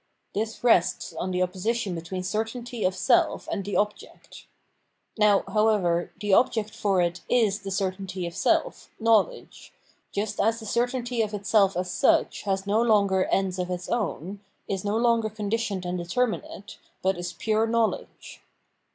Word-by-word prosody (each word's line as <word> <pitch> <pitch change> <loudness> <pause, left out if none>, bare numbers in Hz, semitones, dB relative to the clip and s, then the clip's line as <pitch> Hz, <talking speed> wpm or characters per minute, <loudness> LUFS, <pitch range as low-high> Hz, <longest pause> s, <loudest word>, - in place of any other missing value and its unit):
This 220 +3 -3
rests 205 -8 +2
on 185 - -3
the 180 0 +1
opposition 195 +3 -2
between 175 +2 -5
certainty 225 +4 -3
of 185 0 +1
self 235 +6 +2
and 200 - -2
the 200 +1 -4
object. 210 0 -4 0.7
Now, 210 -2 +4
however, 205 -6 +2
the 205 -2 0
object 220 -1 +3
for 195 -5 +1
it 175 +1 -2
is 215 -4 +2
the 195 - -7
certainty 190 -1 -3
of 170 - -6
self, - - 0
knowledge: 230 - +1 0.4
just 205 +1 -3
as 225 +2 +1
the 220 - -9
cer 235 +3 +1
tainty 245 -2 -2
of 210 -1 -3
itself 200 -2 +2
as 180 0 -2
such - - +2
has 195 0 0
no 210 +3 +2
longer 200 -5 +3
ends 190 -1 0
of 180 0 -2
its 180 0 -4
own, 200 - -2 0.3
is 195 -2 -3
no 205 +1 0
longer 230 -2 +2
conditioned 210 -2 -2
and 180 0 -2
determinate, 205 +2 -3 0.2
but 190 +1 +2
is 175 +1 -5
pure 220 +5 0
knowledge. 230 -1 -2
205 Hz, 160 wpm, -26 LUFS, 185-225 Hz, 0.7 s, Now